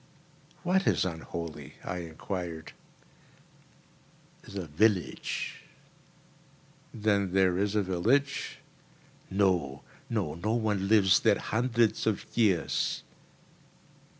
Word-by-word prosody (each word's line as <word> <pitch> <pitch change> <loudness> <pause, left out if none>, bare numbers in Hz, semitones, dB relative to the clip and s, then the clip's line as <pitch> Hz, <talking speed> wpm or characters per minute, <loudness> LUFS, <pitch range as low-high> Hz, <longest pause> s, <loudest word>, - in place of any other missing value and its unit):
"What 190 +2 +2
is - - +3
unholy?" 85 -1 -6
I 90 - -3
enquired. 85 0 -5 1.7
"The 100 -3 -6
village." 90 +4 0 1.3
"Then 100 -3 +1
there 95 -2 +4
is 100 +1 0
a 105 - +3
village?" 115 +10 +1 0.7
"No, 90 -9 +1 0.3
no. 75 - -1
No 95 +7 -1
one 105 -4 0
lives 100 -2 +5
there - - +4
hundreds 115 -1 +1
of 110 - 0
years." 95 - +1
95 Hz, 90 wpm, -29 LUFS, 85-110 Hz, 1.7 s, lives